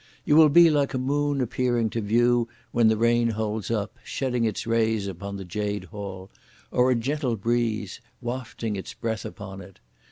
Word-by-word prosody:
You 150 - +4
will 155 -1 +8
be 170 +2 +7
like 145 -3 +1
a - - +1
moon 145 +2 0
appearing 120 -2 0
to 115 - -2
view 120 +3 +3 0.2
when 115 -2 +4
the 110 0 +3
rain 115 +1 +3
holds 110 -1 -2
up, 115 +1 -2
shedding 125 -3 -1
its 110 -3 -2
rays 110 -2 +1
upon 100 +1 -6
the 95 - -7
Jade 105 +3 -3
Hall; 100 -3 -8 0.4
or 125 +1 +3
a 130 - +3
gentle 130 +1 -1
breeze 110 -2 -1 0.2
(wafting 120 -3 -4
its 95 - -7
breath 110 -2 -3
upon 95 -1 -8
it). 95 0 -14
115 Hz, 180 wpm, -25 LUFS, 105-125 Hz, 0.4 s, will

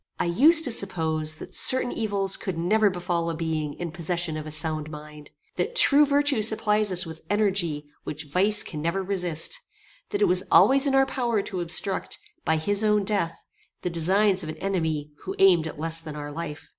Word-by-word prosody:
I - - 0
used 300 - +5
to 255 - -1
suppose 160 -7 -1
that - - -11
certain 260 -1 +3
evils 200 -3 -1
could 185 -4 -5
never 205 +5 +2
befall 175 -2 -2
a 165 - -3
being 155 -3 -3
in 175 -2 -5
possession 170 -1 -1
of 155 0 -6
a - - -7
sound 155 0 -2
mind; 150 -1 -11 0.3
that - - -2
true 295 - +6
virtue 285 -4 +2
supplies 215 -1 +2
us 180 +1 -1
with 160 0 -10
energy 190 -8 0 0.2
which 155 +2 -5
vice 195 +8 +1
can 150 - -7
never 170 +5 -1
resist; 180 -4 -1 0.5
that 410 -1 0
it - - +4
was 365 - +3
always 275 +1 +5
in 270 - +1
our 270 0 +5
power 240 -6 -1
to 185 -3 -5
obstruct, 180 +3 -1 0.3
by 160 -1 +1
his 205 +6 -1
own 210 -1 +2
death, 195 -5 -2 0.4
the 180 - -2
designs 190 +4 +2
of 155 - -7
an 155 - -7
enemy 160 -6 -2
who - - -6
aimed 180 -4 +4
at 150 - -8
less 165 +1 -2
than 155 -2 -8
our 145 0 -6
life. 150 -1 -7
180 Hz, 195 wpm, -25 LUFS, 160-210 Hz, 0.5 s, true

